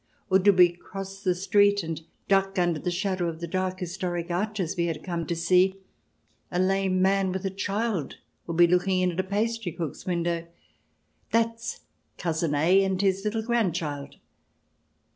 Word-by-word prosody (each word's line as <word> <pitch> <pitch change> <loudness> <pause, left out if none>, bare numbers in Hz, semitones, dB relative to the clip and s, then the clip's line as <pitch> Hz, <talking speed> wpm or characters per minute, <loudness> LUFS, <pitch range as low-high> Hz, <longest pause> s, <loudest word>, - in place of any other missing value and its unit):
Or 190 - +6
did 195 0 +4
we 180 -1 +7
cross 195 +2 -8
the 185 -3 +1
street 205 +2 +3
and 160 -1 -4 0.3
duck 195 0 +2
under 175 -3 +1
the 180 - -2
shadow 185 0 -1
of 160 -1 -7
the 170 - -4
dark 185 +2 -2
historic 175 -1 -3
arches 190 -1 -1
we 170 -1 0
had 165 -2 -4
come 170 -3 -3
to 170 - -1
see, 180 +3 +3 0.7
a 175 - -3
lame 190 0 +2
man 195 0 +2
with 190 +1 -4
a 195 - -1
child 200 -2 -2 0.3
would 170 -1 -3
be 175 - +8
looking 180 +2 +2
in 180 0 +2
at 175 - -6
a - - +2
pastry 215 +1 -1
cook's 165 0 -6
window 170 -1 -1 0.3
— - - -44
" - - -42
That's 230 0 0 0.4
Cousin 165 -3 -1
A 180 +7 +4
and 190 -1 0
his 195 -1 +1
little 220 +1 -1
grand 225 -7 +1
child." 145 -4 -4
185 Hz, 180 wpm, -26 LUFS, 175-195 Hz, 0.7 s, be